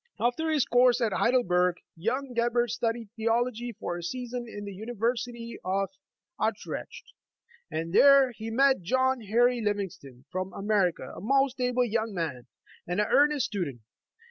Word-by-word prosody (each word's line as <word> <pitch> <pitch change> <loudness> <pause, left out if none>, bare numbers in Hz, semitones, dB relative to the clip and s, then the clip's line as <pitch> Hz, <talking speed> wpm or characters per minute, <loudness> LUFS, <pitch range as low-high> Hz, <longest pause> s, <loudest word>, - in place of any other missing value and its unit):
After 245 +7 0
his 305 -4 +2
course 245 0 +4
at 225 -4 0
Heidelberg, 180 -8 +2 0.2
young 250 +9 -2
Gebhard 240 0 +1
studied 230 -1 -2
theology 235 +1 0
for 175 -4 -3
a - - -6
season 245 +5 -4
in 205 -1 -7
the 200 - -6
University 235 +2 -3
of 195 +1 0 0.5
Utrecht, - - -4 0.6
and 165 +2 -4
there 275 +1 +7
he 225 -1 -7
met 265 +1 +3
John 260 +6 +1
Henry 240 +3 +2
Livingston, 180 - -4
from 185 +1 -3
America, 200 -3 0
a - - -8
most 270 +4 +2
able 250 0 +2
young 220 -2 -2
man, 155 -8 -3 0.4
and 180 +3 -1
an 210 - +3
earnest 290 -1 +4
stu 200 -5 -2
dent. 135 -7 -7
230 Hz, 150 wpm, -28 LUFS, 195-250 Hz, 0.6 s, there